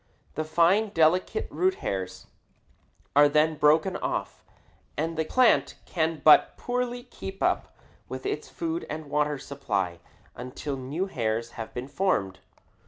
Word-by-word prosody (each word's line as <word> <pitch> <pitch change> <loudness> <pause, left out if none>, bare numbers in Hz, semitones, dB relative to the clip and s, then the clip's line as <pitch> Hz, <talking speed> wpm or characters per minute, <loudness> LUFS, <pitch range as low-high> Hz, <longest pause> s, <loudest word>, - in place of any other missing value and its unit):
The 155 - -2
fine, 170 +7 +3
delicate 180 - +2
root 375 +1 +1
hairs 95 - -4 0.9
are 145 0 +7
then 155 +2 +3
broken 155 +5 +3
off, - - -3 0.5
and 165 +2 -1
the 160 0 -1
plant 255 +7 +3
can 160 -2 -1
but 155 - +7
poorly 245 0 -2
keep 195 -6 -7
up - - 0 0.3
its 405 +1 -4
food 335 0 -4
and 155 -1 -6
water 150 0 +1
supply 100 -12 -3 0.4
until 130 +3 -5
new 135 +8 -3
hairs 115 - -2
have 115 -1 -7
been 125 +1 -4
formed. 100 - 0
155 Hz, 130 wpm, -27 LUFS, 135-190 Hz, 0.9 s, are